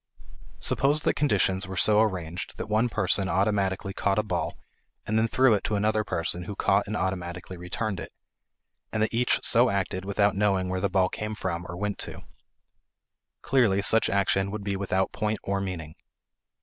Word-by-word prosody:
Suppose 145 +2 +2
that - - +2
conditions 100 -8 +1
were 95 0 -6
so 105 +4 +6
arranged 90 -5 -3
that - - -4
one 110 +3 +1
person 100 -2 +2
automatically 95 -1 0
caught 100 +1 0
a 105 - +2
ball 105 - -3 0.5
and 110 - -2
then 110 +1 +3
threw 130 +1 +4
it 100 - 0
to 105 - -1
another 105 +1 +1
person 85 -1 -3
who 100 - -6
caught 100 +2 +1
and 105 +1 -2
automatically 90 -1 -4
returned 90 +3 -4
it; - - -8 0.8
and 110 -1 0
that 110 - -1
each 120 +2 +1
so 120 +1 +4
acted 95 -2 -2
without 100 +1 +1
knowing 95 -2 +1
where 95 0 -2
the 100 - +1
ball 95 0 +2
came 105 +3 -5
from 90 -3 -4
or 85 - -6
went 105 +1 -3
to. - - -6 1.2
Clearly, 110 -7 +2
such 110 +2 +4
action 100 0 +1
would 105 0 -5
be 100 -1 -2
without 95 -1 -1
point 105 0 -1
or 100 0 -1
meaning. 85 -5 -5
100 Hz, 180 wpm, -26 LUFS, 95-110 Hz, 1.2 s, so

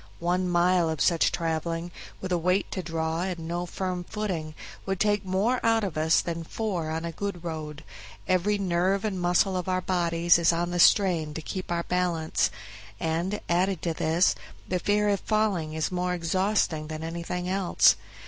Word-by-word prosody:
One 180 +2 0
mile 175 -1 +3
of 160 -2 -3
such 170 +2 +3
traveling, 165 +1 -2 0.3
with 185 - -5
a 175 - +3
weight 180 +4 +1
to 185 - -3
draw 165 -1 -2
and 185 -1 -2
no 175 +1 -3
firm 180 0 -3
footing, 175 -6 -4 0.3
would 195 -1 -2
take 205 -1 +2
more 195 +7 0
out 225 -1 +3
of 190 -6 -3
us 160 +1 +3
than 170 -1 -4
four 180 -3 -3
on 160 +1 -3
a 170 - -3
good 190 0 -5
road; 155 -2 -6 0.4
every 185 +3 +2
nerve 190 +1 +1
and 190 -4 -2
muscle 180 +2 +2
of 180 0 -2
our 185 0 +1
bodies 170 -2 +2
is 170 0 +4
on 170 +1 -1
the 175 - -2
strain 170 -5 +4
to 160 - -4
keep 185 +1 -5
our 170 0 0
balance; 175 -3 0 0.5
and, 170 +5 -1
added 180 +1 +1
to 170 - 0
this, 160 +3 +2 0.3
the 180 - -1
fear 210 +2 +1
of 200 -1 +1
falling 205 -8 0
is 160 +2 -1
more 180 0 -1
exhausting 175 -2 0
than 155 0 -6
anything 170 +2 -4
else. 190 -1 +4
175 Hz, 180 wpm, -27 LUFS, 165-190 Hz, 0.5 s, is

